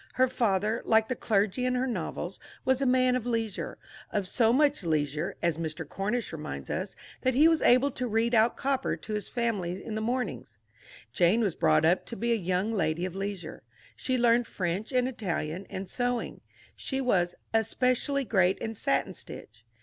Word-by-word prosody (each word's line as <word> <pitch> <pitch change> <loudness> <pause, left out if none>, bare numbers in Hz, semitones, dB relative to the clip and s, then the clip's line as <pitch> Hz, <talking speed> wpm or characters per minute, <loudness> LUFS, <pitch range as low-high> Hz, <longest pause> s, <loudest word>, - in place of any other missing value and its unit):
Her 260 0 +4
father, 220 -3 0
like 220 0 +3
the 255 - 0
clergy 210 +2 +1
in 255 0 +1
her 250 +1 +1
novels, 185 -5 -4 0.3
was 260 +1 +2
a 270 - +2
man 255 0 +4
of 245 -1 -2
leisure 225 -4 -2 0.3
of 200 -3 -1
so 225 +2 +3
much 285 -2 +3
leisure, 155 0 -1
as 170 -2 +1
Mr. 160 -2 -4
Cornish 210 +4 -2
reminds 70 - -6
us, - - -3 0.3
that 255 -1 +1
he 300 +5 +7
was 325 -1 +3
able 255 +3 +5
to 255 0 -3
read 225 +2 +1
out 225 +1 +4
Cowper 270 0 0
to 215 - -7
his 210 -2 -3
family 205 -7 -2
in 220 - -5
the 215 - -2
mornings. 215 - -3 0.6
Jane 180 - +3
was 200 -6 +1
brought 155 -1 +3
up 175 +3 +2
to 235 - -5
be 235 +1 -1
a - - +4
young 185 +2 -1
lady 165 -3 0
of 185 - -5
leisure. 195 -4 -5 0.3
She 255 -1 -1
learned 235 -1 +3
French 185 +5 -3
and 250 -1 +2
Italian 185 -7 -3
and 190 0 -5
sewing: 245 +1 -2 0.3
she 265 - -3
was 180 -9 +1 0.2
"especially 255 +5 +1
great 190 -6 +2
in 225 - -4
satin 215 - 0
stitch." 110 - -10
220 Hz, 185 wpm, -28 LUFS, 180-250 Hz, 0.6 s, he